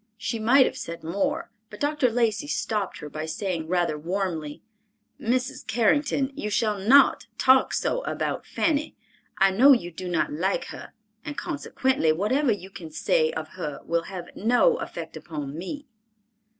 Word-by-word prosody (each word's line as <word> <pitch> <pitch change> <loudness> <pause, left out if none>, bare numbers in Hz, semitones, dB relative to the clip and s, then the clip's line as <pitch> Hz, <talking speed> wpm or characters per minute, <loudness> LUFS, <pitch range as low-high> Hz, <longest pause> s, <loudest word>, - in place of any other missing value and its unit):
She 230 0 -3
might 255 +5 +5
have - - -3
said 170 0 -7
more, 255 - -2 0.2
but 210 - -11
Dr. 290 -3 +2
Lacey 230 +2 0
stopped 210 -8 -2
her 150 - -6
by 155 +1 -5
saying 165 0 -3
rather 175 -3 0
warmly, 165 -3 -3 0.6
"Mrs. 250 +3 -1
Carrington, 275 +3 +1
you 210 - -3
shall 210 -1 0
not 265 +8 +5
talk 260 0 +5
so - - 0
about - - -2
Fanny. 310 -1 0 0.4
I 195 -1 +5
know 260 +9 +7
you 175 -9 -1
do 180 +2 -7
not 170 -4 0
like 185 +6 0
her, - - -10 0.3
and 295 -1 -6
consequently, 265 - 0
whatever 230 - +1
you 195 -2 -4
can 170 -4 -9
say 155 0 +1
of 155 -1 -5
her 150 -6 -6
will 170 0 0
have 180 -3 -8
no 245 - +3
effect - - -7
upon 150 -3 -6
me." 280 - -6
200 Hz, 160 wpm, -25 LUFS, 170-260 Hz, 0.6 s, know